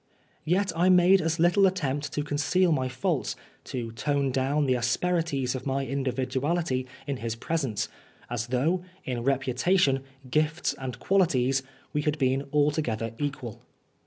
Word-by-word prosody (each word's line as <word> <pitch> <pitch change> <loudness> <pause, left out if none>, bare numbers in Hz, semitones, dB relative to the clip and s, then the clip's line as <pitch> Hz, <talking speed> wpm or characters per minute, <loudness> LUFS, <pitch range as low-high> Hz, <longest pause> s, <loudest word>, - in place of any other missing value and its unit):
Yet 185 +4 +2
I 175 +3 +3
made 185 +1 +6
as 165 +1 0
little 175 +4 +5
attempt 145 -6 -2
to 150 - -1
conceal 150 +5 +2
my 130 -4 +1
faults, 130 0 -1 0.3
to 120 -3 -4
tone 140 +4 0
down 135 +3 +1
the 130 - +3
asperities 135 +2 0
of 130 +1 -5
my 135 +1 0
individuality 135 +2 -1 0.2
in 140 -1 -2
his 115 -2 -3
pre 160 +8 -3
sence, 130 -9 -1 0.4
as 120 -1 -3
though, 150 +9 +1 0.2
in 125 -2 -2
reputation, 135 +3 +2 0.3
gifts 155 +5 +1
and 130 -2 -6
qualities, 135 -7 +2 0.3
we 150 - +1
had 150 0 0
been 135 0 +1
altogether 145 -7 +1
equal. 135 -6 -4
140 Hz, 145 wpm, -27 LUFS, 130-165 Hz, 0.4 s, made